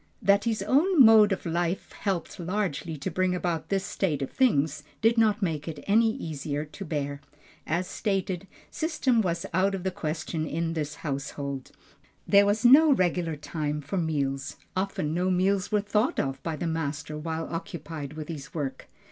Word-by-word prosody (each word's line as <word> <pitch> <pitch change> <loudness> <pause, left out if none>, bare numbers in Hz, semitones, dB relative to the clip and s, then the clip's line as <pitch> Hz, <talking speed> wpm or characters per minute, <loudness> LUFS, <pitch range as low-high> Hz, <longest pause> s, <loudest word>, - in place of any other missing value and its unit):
That 200 +2 +3
his 220 -4 0
own 305 - +3
mode 215 -2 +7
of 195 - -2
life 170 +2 -1
helped 190 -5 -3
largely 175 -3 -2
to 140 - -4
bring 185 -1 +1
about 175 -3 -2
this 195 -1 0
state 150 -8 -1
of 135 - -5
things, 155 - +2 0.2
did 225 +1 +4
not 215 -2 +3
make 155 -4 -2
it 160 -2 -6
any 225 +3 +4
easier 150 - -4
to 155 +6 -9
bear. 145 -4 -3 0.5
As 170 +3 0
stated, 195 -2 -2 0.2
system 275 -7 +1
was 170 -2 -1
out 195 +2 +2
of 185 - -6
the 190 - 0
question 155 0 -3
in 165 +2 -2
this 150 -2 -3
household. 140 -1 -4 0.6
There 200 0 +6
was 210 +3 +1
no 290 +5 +8
regular 175 - +1
time 150 0 -3
for 150 +6 -4
meals, 140 -4 -1 0.2
often 185 -5 -1
no 180 +2 +1
meals 190 +2 +1
were 210 -1 +3
thought 210 +4 +1
of 135 -1 -2
by 165 -2 -3
the 160 - -4
master 150 -2 -3
while 160 +1 -3
occupied 155 -3 -6
with 155 -1 -6
his 145 -4 -8
work. 140 -4 -4
170 Hz, 175 wpm, -27 LUFS, 150-200 Hz, 0.6 s, no